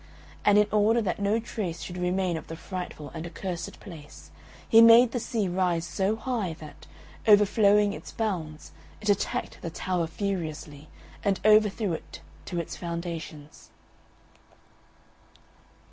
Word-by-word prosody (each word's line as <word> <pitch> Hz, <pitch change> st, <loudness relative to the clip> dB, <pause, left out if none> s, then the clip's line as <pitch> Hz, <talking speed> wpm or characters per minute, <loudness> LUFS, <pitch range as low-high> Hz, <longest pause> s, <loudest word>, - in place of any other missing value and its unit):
And 205 Hz, 0 st, +5 dB
in 210 Hz, -, +6 dB
order 215 Hz, +2 st, +3 dB
that 200 Hz, -5 st, -2 dB
no 205 Hz, +3 st, +1 dB
trace 195 Hz, -7 st, -5 dB
should 180 Hz, -, -7 dB
remain 180 Hz, 0 st, 0 dB
of 160 Hz, -, -7 dB
the 165 Hz, -, -6 dB
frightful 175 Hz, -4 st, -7 dB
and 165 Hz, 0 st, -6 dB
accursed 175 Hz, -1 st, -6 dB
place, 160 Hz, -6 st, -12 dB, 0.4 s
he 225 Hz, -, +7 dB
made 230 Hz, +1 st, +8 dB
the 245 Hz, -, -2 dB
sea 225 Hz, -3 st, -1 dB
rise 175 Hz, -2 st, 0 dB
so 190 Hz, +6 st, 0 dB
high 225 Hz, -7 st, -2 dB
that, 155 Hz, -1 st, -13 dB, 0.4 s
overflowing 205 Hz, 0 st, +5 dB
its -, -, -9 dB
bounds, 170 Hz, -9 st, -4 dB, 0.3 s
it 210 Hz, -, -3 dB
attacked 200 Hz, -1 st, -1 dB
the 170 Hz, -, -4 dB
tower 175 Hz, +1 st, -2 dB
furiously, 160 Hz, -5 st, -5 dB, 0.3 s
and 200 Hz, -1 st, +1 dB
overthrew 215 Hz, -2 st, +4 dB
it 160 Hz, -, -8 dB, 0.2 s
to 175 Hz, -, -3 dB
its 170 Hz, -, -5 dB
foundations. 170 Hz, -3 st, -7 dB
185 Hz, 135 wpm, -27 LUFS, 165-210 Hz, 0.4 s, made